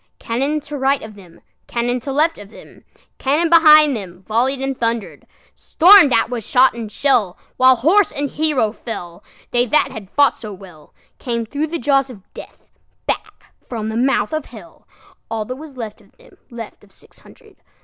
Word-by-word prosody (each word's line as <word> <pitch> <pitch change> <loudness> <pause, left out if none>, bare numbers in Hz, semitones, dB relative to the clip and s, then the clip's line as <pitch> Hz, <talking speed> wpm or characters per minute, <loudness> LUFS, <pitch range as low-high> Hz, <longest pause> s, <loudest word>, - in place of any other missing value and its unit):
Cannon 275 +6 -2
to 295 0 -8
right 270 +1 +1
of 220 0 -10
them, 185 -5 -17 0.3
Cannon 245 +1 -1
to 275 +3 -6
left 310 +2 +1
of 205 -1 -12
them, - - -16 0.3
Cannon 310 +5 0
behind 305 -4 +7
themVolley'd 215 +7 -2
and 270 0 -3
thunder'd; 230 -2 -4 0.3
Storm'd 360 -4 +6
at 230 0 +1
with 235 -3 -4
shot 260 +2 +3
and 225 -2 -7
shell, 225 -11 +1 0.2
While 260 0 +6
horse 330 - +3
and 285 +1 -3
hero 295 -8 0
fell, 175 -7 -8 0.3
They 245 0 +1
that 300 - +2
had 205 -4 -9
fought 285 +4 +3
so 210 -3 -9
wellCame 195 - -8
thro' 290 +6 -3
the 335 +2 -4
jaws 275 0 +1
of 210 -7 -12
Death, - - -13 0.3
Back - - -5
from 220 -3 -5
the 220 - -5
mouth 240 -1 0
of 310 -2 -2
Hell, - - -15 0.4
All 220 -1 -3
that 255 - -6
was 295 -2 -12
left 220 -3 -7
of - - -26
them, - - -21
Left 230 -4 -10
of 200 - -22
six - - -20
hundred. - - -20
250 Hz, 180 wpm, -18 LUFS, 220-290 Hz, 0.4 s, behind